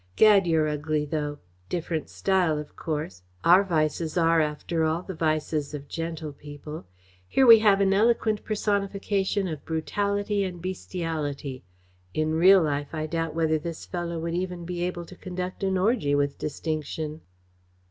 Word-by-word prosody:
"Gad, 205 -4 +6
you're 160 -2 +3
ugly, 150 0 -1
though! 150 -1 -3 0.3
Different 165 -2 -3
style, 185 -5 +1
of 150 0 -7
course. 150 - -4 0.2
Our 180 +3 +7
vices 160 -2 0
are, 165 -1 +4
after 155 +2 -1
all, 160 +2 0
the 190 - -6
vices 155 -2 -1
of 140 -1 -8
gentle 165 -2 -5
people. 145 - -9 0.4
Here 265 - +3
we 230 -2 +10
have 205 -2 +4
an 195 0 +3
eloquent 220 0 +2
personification 200 -1 0
of 155 -4 -5
brutality 200 +5 -1
and 180 -2 -4
bestiality. 160 -7 -4 0.5
In 155 0 +1
real 185 +3 +6
life 145 0 -2
I 155 0 -2
doubt 165 0 -2
whether 160 -1 +2
this 165 +1 -6
fellow 175 -2 -4
would 165 +1 -3
even 180 -1 -3
be 175 0 -4
able 175 -1 -3
to 185 - -12
conduct 180 0 -5
an 190 -1 +1
orgy 190 - +2
with 145 0 0
distinction." 155 0 -4
165 Hz, 155 wpm, -26 LUFS, 155-190 Hz, 0.5 s, we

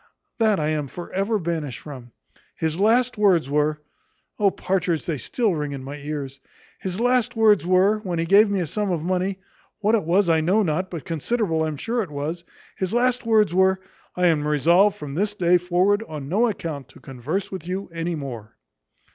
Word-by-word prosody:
that 220 -4 +3
I 150 0 0
am 150 -2 -1
for 175 +6 -9
ever 200 +4 0
banished 160 - -3
from. 130 -5 -10 0.4
His 160 +1 -2
last 235 +3 +2
words 175 -9 +3
were 150 +1 0 0.6
O, 205 -1 +4
Partridge, 180 -4 -1
they 155 -5 -2
still 225 - 0
ring 150 -3 -3
in 135 -1 -6
my 140 +2 -7
ears 140 -2 -6 0.4
his 190 +1 -4
last 245 0 +2
words 215 -5 +4
were, 190 +4 +4
when 185 -5 -4
he 165 - 0
gave 200 +5 +5
me 200 -2 0
a - - -1
sum 205 +6 -2
of 170 -4 -1
money 185 +2 -1 0.4
what 215 +1 +1
it 225 - +3
was 180 +4 +2
I 160 -1 +3
know 190 +7 +2
not, 185 +2 -1
but 170 -4 -7
considerable 165 - -1
I'm 155 -2 -3
sure 235 - -1
it 190 - -5
was 150 +4 -4 0.3
his 190 +3 -2
last 245 -1 +1
words 215 -5 +3
were 190 +1 +3 0.4
`I 180 - 0
am 155 -4 +3
resolved 170 +8 +4
from 145 -7 -7
this 205 +6 -1
day 180 -2 +3
forward, 180 +4 +2
on 150 -3 -7
no 210 +10 +2
account 160 - -5
to - - -16
converse 145 +9 -4
with 185 -3 -7
you 190 +2 -3
any 165 +1 -2
more.'" 125 -8 -8
180 Hz, 195 wpm, -23 LUFS, 155-205 Hz, 0.6 s, gave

